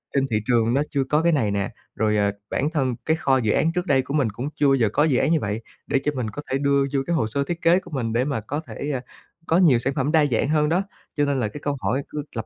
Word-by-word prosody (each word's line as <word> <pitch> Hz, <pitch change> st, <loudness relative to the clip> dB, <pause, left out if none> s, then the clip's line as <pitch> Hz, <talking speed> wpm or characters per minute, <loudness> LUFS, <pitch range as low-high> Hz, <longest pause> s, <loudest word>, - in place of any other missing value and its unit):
trên 135 Hz, -1 st, +3 dB
thị 110 Hz, -, +2 dB
trường 115 Hz, -1 st, +2 dB
nó 140 Hz, -, +2 dB
chưa 140 Hz, -2 st, 0 dB
có 150 Hz, +4 st, +1 dB
cái 170 Hz, 0 st, +3 dB
này 110 Hz, -9 st, +1 dB
nè, 100 Hz, -1 st, -1 dB, 0.3 s
rồi, 105 Hz, -1 st, +1 dB
ờ, 100 Hz, -1 st, +2 dB, 0.2 s
bản 145 Hz, +3 st, 0 dB
thân 130 Hz, -5 st, 0 dB
cái 160 Hz, 0 st, +2 dB
kho 135 Hz, -3 st, +2 dB
dự 110 Hz, -4 st, +1 dB
án 165 Hz, -, +2 dB
trước 180 Hz, 0 st, -1 dB
đây 135 Hz, -5 st, +3 dB
của 135 Hz, +2 st, -6 dB
mình 140 Hz, -7 st, +2 dB
cũng 120 Hz, +8 st, -5 dB
chưa 145 Hz, -, +2 dB
bao 135 Hz, -, +5 dB
giờ 115 Hz, -5 st, +2 dB
có 150 Hz, -, +3 dB
dự 140 Hz, -6 st, +2 dB
án 160 Hz, -, +2 dB
như 160 Hz, -, +3 dB
vậy, 105 Hz, 0 st, -3 dB, 0.3 s
để 140 Hz, -1 st, +2 dB
cho 150 Hz, -, +1 dB
mình 120 Hz, -4 st, -2 dB
có 145 Hz, +8 st, -6 dB
thể 135 Hz, -, +2 dB
đưa 140 Hz, 0 st, +2 dB
vô 135 Hz, -, +2 dB
cái 170 Hz, -, 0 dB
hồ 110 Hz, -, +1 dB
sơ 140 Hz, +6 st, -1 dB
thiết 170 Hz, +4 st, -4 dB
kế 175 Hz, +3 st, +4 dB
của 175 Hz, -, -14 dB
mình, 115 Hz, -5 st, -2 dB
để 125 Hz, +3 st, +1 dB
mà 140 Hz, -7 st, -2 dB
có 145 Hz, +8 st, -4 dB
thể, 145 Hz, +1 st, -4 dB
à, 130 Hz, -2 st, -2 dB, 0.5 s
có 165 Hz, -, +3 dB
nhiều 150 Hz, -10 st, +5 dB
sản 135 Hz, +3 st, -1 dB
phẩm 140 Hz, +1 st, 0 dB
đa 155 Hz, -3 st, +4 dB
dạng 130 Hz, +1 st, 0 dB
hơn 150 Hz, -1 st, +2 dB
đó. 180 Hz, +3 st, +2 dB, 0.3 s
Cho 145 Hz, -1 st, +2 dB
nên 140 Hz, -2 st, 0 dB
là 110 Hz, -, 0 dB
cái 150 Hz, +7 st, -8 dB
câu 145 Hz, -1 st, -2 dB
hỏi 115 Hz, +9 st, 0 dB
cứ 150 Hz, -1 st, -4 dB
lặp 115 Hz, -, -3 dB
140 Hz, 315 wpm, -23 LUFS, 115-150 Hz, 0.5 s, bao